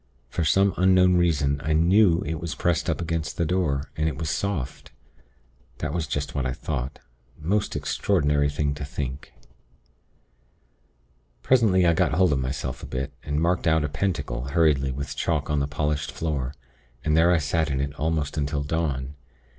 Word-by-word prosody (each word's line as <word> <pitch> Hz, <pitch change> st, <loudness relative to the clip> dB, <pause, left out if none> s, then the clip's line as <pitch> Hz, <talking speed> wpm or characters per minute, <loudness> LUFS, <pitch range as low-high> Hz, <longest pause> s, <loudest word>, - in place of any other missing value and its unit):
For 85 Hz, -, -1 dB
some 95 Hz, +5 st, +3 dB
unknown 90 Hz, -1 st, +5 dB
reason 70 Hz, -5 st, +1 dB
I 80 Hz, -, +1 dB
knew 85 Hz, +2 st, +4 dB
it 80 Hz, +1 st, -3 dB
was 85 Hz, 0 st, -4 dB
pressed 85 Hz, -2 st, 0 dB
up -, -, -1 dB
against 85 Hz, -1 st, -3 dB
the 85 Hz, -, +1 dB
door, 75 Hz, -5 st, -1 dB
and 80 Hz, +1 st, 0 dB
it -, -, -6 dB
was 80 Hz, -1 st, -2 dB
soft. 95 Hz, -11 st, -3 dB, 0.9 s
That 75 Hz, -1 st, -3 dB
was 85 Hz, -4 st, -2 dB
just 70 Hz, +2 st, -3 dB
what 70 Hz, -, -1 dB
I 65 Hz, 0 st, -1 dB
thought. 70 Hz, -2 st, -4 dB, 0.4 s
Most 100 Hz, +7 st, -1 dB
extraordinary 75 Hz, -7 st, +1 dB
thing 70 Hz, 0 st, -1 dB
to 70 Hz, 0 st, -6 dB
think. 70 Hz, -1 st, -5 dB, 2.1 s
"Presently 105 Hz, -8 st, +4 dB
I 85 Hz, -, +5 dB
got 80 Hz, -, +1 dB
hold 90 Hz, -1 st, +3 dB
of 70 Hz, -, 0 dB
myself 65 Hz, -1 st, -3 dB
a -, -, -7 dB
bit, 65 Hz, +1 st, -4 dB
and 75 Hz, +1 st, -2 dB
marked 85 Hz, +2 st, +1 dB
out 80 Hz, -1 st, +3 dB
a 75 Hz, -, -1 dB
pentacle 75 Hz, -7 st, -2 dB
hurriedly 70 Hz, -3 st, +2 dB
with 70 Hz, +2 st, -5 dB
chalk 75 Hz, -2 st, -1 dB
on 75 Hz, -, +2 dB
the 70 Hz, -, 0 dB
polished 75 Hz, 0 st, -2 dB
floor; 70 Hz, -4 st, -3 dB, 0.5 s
and 75 Hz, -1 st, +2 dB
there 80 Hz, +2 st, +5 dB
I 90 Hz, -, +4 dB
sat 80 Hz, +1 st, 0 dB
in 65 Hz, -1 st, -1 dB
it 70 Hz, +1 st, -2 dB
almost 75 Hz, 0 st, -1 dB
until 70 Hz, 0 st, -1 dB
dawn. 70 Hz, -3 st, -2 dB
75 Hz, 175 wpm, -25 LUFS, 70-85 Hz, 2.1 s, unknown